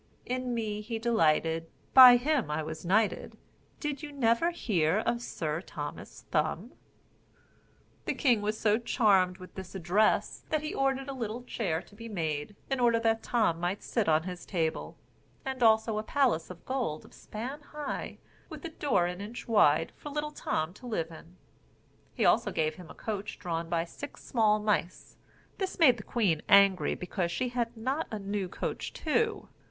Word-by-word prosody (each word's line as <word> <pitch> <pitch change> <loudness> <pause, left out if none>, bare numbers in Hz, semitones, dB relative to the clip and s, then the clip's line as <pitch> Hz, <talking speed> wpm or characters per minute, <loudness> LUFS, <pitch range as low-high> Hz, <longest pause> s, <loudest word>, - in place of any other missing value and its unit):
In 250 -1 -2
me 210 -2 -2
he 225 +2 -4
delighted, 165 -7 +1 0.2
By 250 -2 +11
him 275 - 0
I 150 +1 -1
was 155 +1 -6
knighted, 205 +4 +1 0.4
Did 295 -1 -3
you 295 -1 -7
never 245 +3 +2
hear 185 - +1
of 235 +2 0
Sir 160 -7 -3
Thomas 145 -5 -8
Thumb?" 165 - 0 1.3
The - - -1
king 245 -7 +3
was 215 +1 -2
so 215 0 +3
charmed 195 -6 +3
with 185 -1 -12
this 190 0 -9
address, 190 +4 +1
that 310 -1 0
he 305 - -3
ordered 270 0 0
a 275 - -4
little 235 -1 -4
chair 180 -9 -2
to - - -21
be 230 +2 -9
made, 160 -2 -3
in 270 -1 -1
order 235 -2 +4
that 225 0 +2
Tom 220 -9 +1
might 175 +3 -2
sit 225 -7 0
on 155 0 +3
his 180 0 -6
table, 165 -4 -2 0.5
and 265 -1 -4
also 220 -1 +4
a - - -1
palace 240 - +1
of 180 -2 -11
gold 245 - -2
a - - -16
span 255 +7 -7
high, 295 0 -5 0.3
with 310 -1 -9
a - - -3
door 285 - +1
an 180 +2 -4
inch 220 +4 -7
wide, 165 -8 +4
for 295 - -8
little 300 +1 -3
Tom 160 - -2
to 250 +5 -12
live 165 -8 -2
in. 165 +2 -13 0.8
He - - +1
also - - +4
gave 155 -1 0
him 175 0 -12
a - - -11
coach 210 -1 -5
drawn 165 -2 -3
by 165 -1 0
six 285 +11 -10
small 215 -3 +3
mice. 210 -4 -1 0.4
This 385 -1 -3
made 265 -8 +6
the - - -7
queen 200 -9 0
angry, 200 -2 +5
because 180 -1 -3
she 250 +7 -1
had 240 -1 -2
not 265 +8 -2
a 215 - -4
new 200 -2 -3
coach - - -4
too. 425 +7 0
215 Hz, 180 wpm, -30 LUFS, 175-250 Hz, 1.3 s, By